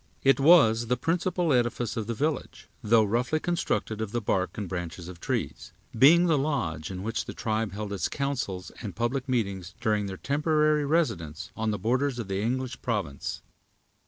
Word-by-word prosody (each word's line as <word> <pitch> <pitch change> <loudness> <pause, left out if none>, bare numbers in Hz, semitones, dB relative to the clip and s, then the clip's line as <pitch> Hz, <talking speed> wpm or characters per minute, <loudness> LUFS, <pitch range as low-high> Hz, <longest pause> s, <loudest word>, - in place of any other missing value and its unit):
It 135 0 +5
was 135 -7 +6
the 125 +2 +1
principal 170 +3 0
edifice 120 -1 0
of 110 -3 -3
the 115 - -2
village, 150 +3 -3
though 110 +1 +4
roughly 120 +8 0
constructed 155 -10 -1
of 110 -2 -3
the 120 - +1
bark 95 -4 -1
and 105 -3 -3
branches 85 -1 -5
of 90 -2 -9
trees; - - -3 0.2
being 160 +9 +7
the 160 -4 +3
lodge 90 - -2
in 95 -1 -6
which 115 +2 -2
the - - -7
tribe 110 -3 -1
held 105 0 -4
its 100 - -1
councils 125 - -3
and - - -6
public 125 +4 -1
meetings 100 -7 -2
during 105 -2 0
their 95 -1 -6
temporary 150 - +2
residence 85 - -1
on 110 0 -1
the 105 - -1
borders 130 +4 0
of 115 -5 -5
the 95 +1 -1
English 130 +3 -2
province. 100 - -3
115 Hz, 180 wpm, -27 LUFS, 100-140 Hz, 0.2 s, being